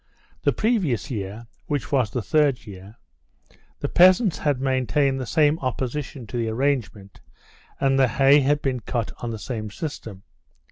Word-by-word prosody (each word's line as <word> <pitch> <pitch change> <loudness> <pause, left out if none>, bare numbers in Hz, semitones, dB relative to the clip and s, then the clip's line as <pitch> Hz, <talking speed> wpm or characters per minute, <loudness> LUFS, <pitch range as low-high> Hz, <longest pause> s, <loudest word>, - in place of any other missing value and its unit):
The - - +2
previous 180 - 0
year—which 115 +6 -5
was 130 -6 +2
the 115 +2 -3
third 145 -4 +1
year—the 70 - -12
peasants 185 +1 +5
had 145 -4 0
maintained 135 +1 +1
the 125 - -5
same 155 +1 +2
opposition 130 0 -4
to 120 - -6
the 115 -1 -1
arrangement, 110 -6 -2 0.6
and 135 0 +2
the 130 - +5
hay 135 +4 +5
had 145 +2 +1
been 130 -2 -1
cut 115 0 -3
on 120 - -4
the 115 - -4
same 110 -1 -5
system. 110 - -7
130 Hz, 145 wpm, -23 LUFS, 110-145 Hz, 0.6 s, peasants